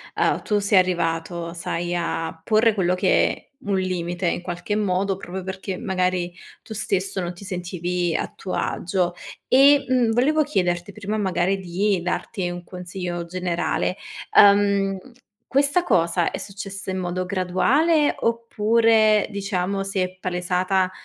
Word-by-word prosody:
uhm, -, -, +1 dB
tu 210 Hz, -1 st, 0 dB
sei 200 Hz, 0 st, +3 dB
arrivato, 170 Hz, -1 st, -1 dB
sai, 175 Hz, 0 st, -3 dB
a 165 Hz, -1 st, -3 dB
porre 220 Hz, +3 st, +3 dB
quello 180 Hz, -2 st, +1 dB
che 185 Hz, -, +1 dB, 0.2 s
un 200 Hz, -1 st, +1 dB
limite, 180 Hz, -1 st, -2 dB
in 170 Hz, -, -1 dB
qualche 180 Hz, +4 st, -3 dB
modo, 195 Hz, -1 st, 0 dB
proprio 190 Hz, 0 st, -6 dB
perché, 190 Hz, 0 st, -5 dB
magari, 185 Hz, -4 st, -1 dB, 0.3 s
tu 220 Hz, -, -8 dB
stesso 195 Hz, -2 st, -1 dB
non 175 Hz, 0 st, -3 dB
ti 175 Hz, -, -13 dB
sentivi 180 Hz, -2 st, -2 dB
a -, -, -2 dB
tuo 185 Hz, -, -6 dB
agio. 180 Hz, -1 st, -1 dB, 0.4 s
E, 280 Hz, +2 st, +6 dB
mhmm, 250 Hz, -3 st, +2 dB
volevo 300 Hz, +6 st, +3 dB
chiederti 180 Hz, -, -1 dB
prima, 210 Hz, +1 st, -3 dB
magari, 190 Hz, -1 st, +1 dB
di 190 Hz, +2 st, 0 dB
darti 180 Hz, 0 st, -2 dB
un 175 Hz, 0 st, -6 dB
consiglio 180 Hz, -1 st, -5 dB
generale: 180 Hz, +1 st, -1 dB, 0.4 s
ehm, 200 Hz, -1 st, +5 dB, 0.5 s
questa 285 Hz, +6 st, +3 dB
cosa, 170 Hz, -, +2 dB
è -, -, -4 dB
successa 195 Hz, -1 st, -6 dB
in 185 Hz, -, -3 dB
modo 185 Hz, 0 st, -2 dB
graduale, 255 Hz, -, +2 dB
oppure, 225 Hz, -1 st, +3 dB
diciamo, 195 Hz, -1 st, -2 dB
si 195 Hz, 0 st, -2 dB
è 185 Hz, 0 st, -2 dB
palesata 185 Hz, +1 st, 0 dB
185 Hz, 140 wpm, -23 LUFS, 175-205 Hz, 0.5 s, E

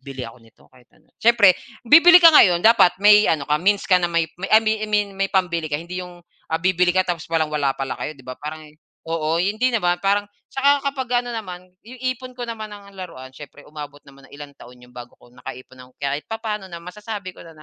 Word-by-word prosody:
bili 135 Hz, -2 st, -8 dB
ako 115 Hz, -, -11 dB
nito 115 Hz, -1 st, -24 dB
kahit 125 Hz, -, -23 dB
ano." -, -, -29 dB
Siyempre 225 Hz, -5 st, +5 dB, 0.3 s
bibili 335 Hz, +7 st, +8 dB
ka 335 Hz, -2 st, +8 dB
ngayon 180 Hz, -, +6 dB
dapat 225 Hz, -6 st, +5 dB
may 210 Hz, +1 st, +5 dB
ano 155 Hz, -3 st, 0 dB
ka 150 Hz, +2 st, 0 dB
means 200 Hz, +2 st, +1 dB
ka 185 Hz, -2 st, +3 dB
na 175 Hz, -, 0 dB
may 170 Hz, -1 st, 0 dB, 0.2 s
may 190 Hz, -, -4 dB
I 220 Hz, -, +7 dB
mean 220 Hz, 0 st, 0 dB
I 215 Hz, -, -4 dB
mean 210 Hz, -1 st, +1 dB
may 195 Hz, -, +1 dB
pambili 170 Hz, -4 st, 0 dB
ka 145 Hz, -, -2 dB
hindi 175 Hz, +3 st, -7 dB
'yong, 180 Hz, -1 st, -11 dB, 0.3 s
ah, 160 Hz, +1 st, -2 dB
bibili 180 Hz, 0 st, +2 dB
ka 185 Hz, -, +3 dB
tapos 170 Hz, -4 st, -5 dB
walang-wala 150 Hz, -4 st, -1 dB
pala 135 Hz, -1 st, -4 dB
kayo 155 Hz, -1 st, -5 dB
'di 135 Hz, -, -18 dB
ba? 130 Hz, -, -7 dB
Parang 155 Hz, +1 st, -8 dB, 0.4 s
oo 165 Hz, 0 st, -1 dB
hindi 215 Hz, +7 st, 0 dB
naman. 180 Hz, -6 st, +1 dB
Parang 205 Hz, +1 st, +1 dB, 0.2 s
'tsaka 280 Hz, +1 st, +2 dB
kapag 260 Hz, -3 st, -5 dB, 0.2 s
ano 245 Hz, -, -6 dB
naman, 185 Hz, -5 st, -8 dB
'yong 245 Hz, +2 st, -14 dB
ipon 255 Hz, 0 st, -13 dB
ko 245 Hz, -, -5 dB
naman 225 Hz, -2 st, -7 dB
ng 200 Hz, -1 st, -13 dB
laruan 130 Hz, -8 st, -10 dB
siyempre 145 Hz, +1 st, -13 dB
umabot 145 Hz, -1 st, -10 dB
naman 135 Hz, -1 st, -18 dB
ng -, -, -15 dB
ilang 145 Hz, -1 st, -11 dB
taon 125 Hz, +1 st, -14 dB
'yun 125 Hz, 0 st, -19 dB
bago 120 Hz, 0 st, -12 dB
ko 120 Hz, -, -22 dB
nakaipon 130 Hz, 0 st, -11 dB
ng -, -, -25 dB
kahit 140 Hz, +1 st, -4 dB
papaano 215 Hz, -3 st, -5 dB
na 170 Hz, -, -9 dB
masasabi 205 Hz, 0 st, -8 dB
ko -, -, -17 dB
na 160 Hz, -, -16 dB
180 Hz, 230 wpm, -21 LUFS, 150-210 Hz, 0.4 s, bibili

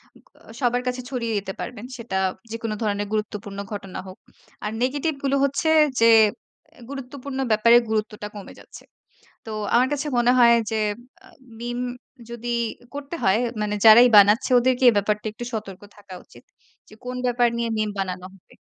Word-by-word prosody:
ও -, -, -19 dB, 0.3 s
আ -, -, -10 dB
সবার 245 Hz, 0 st, +1 dB
কাছে 250 Hz, 0 st, -2 dB
ছড়িয়ে 235 Hz, -4 st, -3 dB
দিতে 195 Hz, -1 st, -4 dB
পারবেন। 235 Hz, -2 st, -7 dB
সেটা 230 Hz, -5 st, -4 dB, 0.3 s
যেকোনো 225 Hz, -1 st, -4 dB
ধরণের 205 Hz, -1 st, -1 dB
গুরুত্বপূর্ণ 210 Hz, -2 st, -4 dB
ঘটনা 195 Hz, -2 st, -7 dB
হোক। 185 Hz, -, -11 dB, 0.5 s
আর 210 Hz, -, -2 dB
নেগেটিভগুলো 275 Hz, +1 st, -1 dB
হচ্ছে 280 Hz, +3 st, 0 dB, 0.3 s
যে 230 Hz, 0 st, +6 dB, 0.7 s
এ -, -, -16 dB
গুরুত্বপূর্ণ 275 Hz, 0 st, -7 dB
ব্যাপারে 230 Hz, +2 st, +6 dB
গুরুত্বটা 215 Hz, -1 st, -3 dB
কমে 205 Hz, -, -10 dB
যাচ্ছে। -, -, -14 dB, 0.6 s
তো 220 Hz, -, -7 dB, 0.2 s
আমার 250 Hz, +2 st, +4 dB
কাছে 290 Hz, +1 st, -3 dB
মনে 240 Hz, +1 st, +4 dB
হয় 235 Hz, -1 st, +7 dB, 0.2 s
যে 220 Hz, -, -1 dB, 0.5 s
আ -, -, -17 dB, 0.3 s
মিম 240 Hz, +1 st, -4 dB, 0.5 s
যদি 235 Hz, 0 st, -6 dB, 0.4 s
করতে 285 Hz, +3 st, -6 dB
হয় 190 Hz, +3 st, +3 dB, 0.2 s
মানে 210 Hz, 0 st, -1 dB
যারাই 230 Hz, +3 st, +9 dB
বানাচ্ছে 210 Hz, +6 st, +5 dB
ওদেরকে 255 Hz, +1 st, +1 dB
এই -, -, +2 dB
ব্যাপারটা 210 Hz, +1 st, -1 dB
একটু 220 Hz, -, -9 dB
সতর্ক 205 Hz, -4 st, -6 dB, 0.2 s
থাকা 200 Hz, -2 st, -13 dB
উচিত। -, -, -18 dB, 0.5 s
যে -, -, -16 dB
কোন 250 Hz, 0 st, -5 dB
ব্যাপার 245 Hz, -1 st, +2 dB
নিয়ে 235 Hz, 0 st, -1 dB
মিম 215 Hz, 0 st, 0 dB
বানানো 185 Hz, -1 st, -4 dB
হবে। 195 Hz, -, -22 dB
230 Hz, 165 wpm, -23 LUFS, 210-250 Hz, 0.7 s, যারাই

